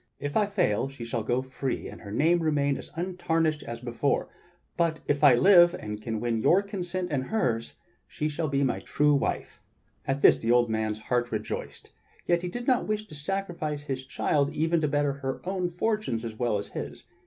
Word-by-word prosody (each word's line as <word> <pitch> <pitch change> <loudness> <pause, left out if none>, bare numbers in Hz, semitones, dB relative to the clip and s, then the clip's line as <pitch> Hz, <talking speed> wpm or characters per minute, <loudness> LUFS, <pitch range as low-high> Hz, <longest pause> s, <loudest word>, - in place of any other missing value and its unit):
If 145 0 -4
I 210 -2 +3
fail, 180 - +1
she 135 -4 -8
shall 115 0 -2
go 120 +4 0
free 130 0 -4
and - - -10
her 100 - -9
name 165 +10 +3
remain 145 -3 +1
as - - -8
untarnished 165 -3 0
as 115 0 -6
before; 120 +3 -1 0.5
but 165 -2 +1
if 145 +1 0
I 140 -4 +8
live, 175 +6 +7
and 105 0 -6
can 110 -1 -3
win 115 -1 -1
your 185 - +4
consent 185 -3 -4
and 130 -3 0
hers, 120 - -1 0.3
she 150 - -3
shall 155 +1 -2
be 140 0 +1
my 130 - 0
true 150 0 +2
wife." 140 - -2 0.5
At 135 +1 -1
this - - +7
the 115 - -3
old 120 -1 +4
man's 110 -1 -1
heart 120 +2 -1
rejoiced, 110 -1 -5 0.3
yet 175 -1 +2
he 180 - -3
did 240 +6 -5
not 255 -2 +2
wish 215 0 -1
to - - -11
sacrifice 155 -2 -3
his 135 -2 -4
child 140 +2 0
even 165 +2 +1
to 150 - +2
better 145 -1 +1
her 135 -1 -4
own 185 -1 -1
fortunes 180 - -1
as 115 - -4
well 115 -1 0
as 100 - -5
his. - - -7
145 Hz, 200 wpm, -27 LUFS, 120-175 Hz, 0.5 s, I